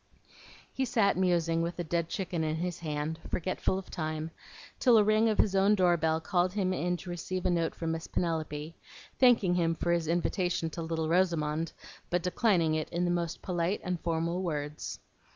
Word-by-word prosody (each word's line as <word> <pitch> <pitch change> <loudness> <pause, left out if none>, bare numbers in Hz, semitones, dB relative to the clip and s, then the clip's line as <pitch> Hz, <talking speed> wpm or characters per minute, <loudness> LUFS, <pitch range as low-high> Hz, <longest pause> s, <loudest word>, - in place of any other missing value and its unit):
He 265 - -1
sat 225 -6 +2
musing 170 -3 +2
with 170 +1 -2
the 175 - -3
dead 170 0 -1
chicken 175 -4 -2
in 155 0 0
his 175 +1 -3
hand, 155 0 -3
forgetful 185 +1 -1
of 190 - -8
time, 155 0 -3 0.5
till 245 -3 +6
a 215 - +6
ring 215 +2 +3
of 215 - 0
his 195 - +3
own 195 +2 +5
door 180 -3 +4
bell 160 -1 +1
called 180 +2 0
him 190 -3 0
in 180 -1 -1
to 180 0 -8
receive 180 +2 -4
a - - +3
note 165 -2 0
from 165 -1 -2
Miss 165 0 -4
Penelope, 160 -2 -2 0.4
thanking 235 -8 +5
him 165 -2 +1
for 170 - -1
his 170 -2 +1
invitation 175 0 0
to 170 - -5
little 160 -1 -2
Rosamond, 165 -2 +1 0.4
but 175 -1 0
declining 180 -4 +2
it 155 0 -1
in 175 +1 -1
the 175 - +1
most 170 -1 -2
polite 180 +1 -1
and 180 -1 -2
formal 170 +2 -1
words. 150 -4 -4
170 Hz, 190 wpm, -30 LUFS, 160-185 Hz, 0.5 s, till